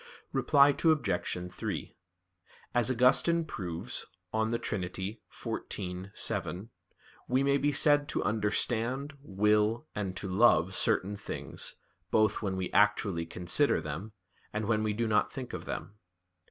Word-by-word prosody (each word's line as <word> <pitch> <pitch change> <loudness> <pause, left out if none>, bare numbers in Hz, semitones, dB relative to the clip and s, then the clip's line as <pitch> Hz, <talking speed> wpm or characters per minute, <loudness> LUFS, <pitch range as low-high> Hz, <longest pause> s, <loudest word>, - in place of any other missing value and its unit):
Reply 140 0 +5
Obj. 100 - 0
3: - - -5 0.8
As 120 -1 +3
Augustine 130 +7 +4
proves 90 - -4 0.3
(De 110 +1 +1
Trin. 105 -4 -3
xiv, 95 -1 -5
7), 95 +6 -1 0.6
we 130 +2 +2
may 140 0 +3
be 145 +1 +1
said 145 0 +3
to - - -1
understand, 115 +6 0
will, 105 +3 +1
and 95 -3 -3
to 100 - -4
love 95 -3 +4
certain 100 +2 +1
things, - - -4 0.3
both 110 -1 +2
when 95 -3 -2
we 95 -1 -3
actually 100 -4 +2
consider 90 - +1
them, 85 +9 -6 0.4
and 105 0 -2
when 110 -1 +2
we 110 -1 0
do 115 +2 -1
not 105 -1 +2
think 130 -3 -7
of - - -5
them. 105 +1 -6
105 Hz, 130 wpm, -30 LUFS, 95-125 Hz, 0.8 s, Reply